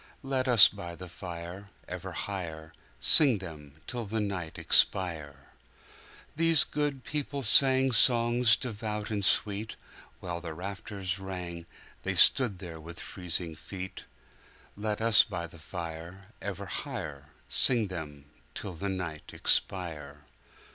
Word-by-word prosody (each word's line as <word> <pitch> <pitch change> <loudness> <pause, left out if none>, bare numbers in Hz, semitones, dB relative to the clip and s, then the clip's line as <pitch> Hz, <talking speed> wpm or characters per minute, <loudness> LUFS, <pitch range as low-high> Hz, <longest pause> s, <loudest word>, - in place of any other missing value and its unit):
Let 135 -1 -1
us 120 -6 +8
by 85 -4 -8
the 90 +1 -10
fire 90 +2 -8 0.2
Ever - - -7
higherSing 95 - +1
them 75 -6 -10
till 120 -4 -5
the 110 +2 -2
night 95 -6 -4
expire! 75 -7 +1 0.8
These 165 -1 +5
good 145 -3 -3
people 145 -2 -4
sang 130 +3 +7
Songs 120 -1 +4
devout 105 -2 -5
and 105 -2 -2
sweet; 105 +2 0 0.4
While 85 -2 -5
the 80 -2 -7
rafters 95 0 -5
rang, 90 -3 -7 0.3
There - - -2
they - - -8
stood 110 -8 +4 0.2
with 85 +1 -10
freezing 90 -2 -4
feet. 95 +4 -9 0.7
Let 105 +1 -3
us 115 -2 +6
by 90 -5 -5
the 85 0 -14
fire 85 +3 -8
Ever 100 0 -5
higherSing 110 +3 0
them 75 -5 -8 0.3
till 100 - -6
the 95 +4 -4
night 85 -5 -5
expire! 75 -6 -1
95 Hz, 120 wpm, -29 LUFS, 85-110 Hz, 0.8 s, us